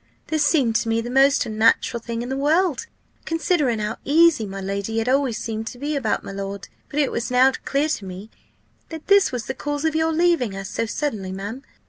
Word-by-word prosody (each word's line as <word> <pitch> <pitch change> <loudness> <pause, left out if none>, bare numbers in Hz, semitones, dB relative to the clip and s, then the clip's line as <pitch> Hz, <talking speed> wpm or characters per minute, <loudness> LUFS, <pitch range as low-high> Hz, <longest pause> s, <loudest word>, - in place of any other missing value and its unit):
This 310 -2 +1
seemed 280 -7 +2
to 230 - -2
me 225 0 +1
the 240 +1 -4
most 275 +2 +4
unnatural 225 +2 +2
thing 230 0 -4
in 245 - -6
the 265 - -2
world, 300 0 +1 0.4
considering 325 -7 0
how 210 0 -3
easy 305 -5 +4
my 195 0 -6
lady 200 +3 -3
had 225 +1 0
always 260 -3 +1
seemed 225 0 -4
to 245 - -7
be 295 +4 -3
about 250 -6 -1
my - - -7
lord; 195 0 -6 0.2
but 295 - -2
it 285 - +2
was 235 - -2
now 255 +2 +5
clear 280 +2 +1
to 210 -10 -3
me, 190 +4 -9 0.6
that 320 -1 -8
this 400 -1 +4
was 245 -4 -4
the 265 - -3
cause 290 +2 -3
of 320 - +1
your 320 0 +2
leaving 320 - +1
us 195 0 -6
so 230 - -2
suddenly, 215 -8 -3
ma'am. 205 +7 -6
250 Hz, 215 wpm, -22 LUFS, 220-295 Hz, 0.6 s, now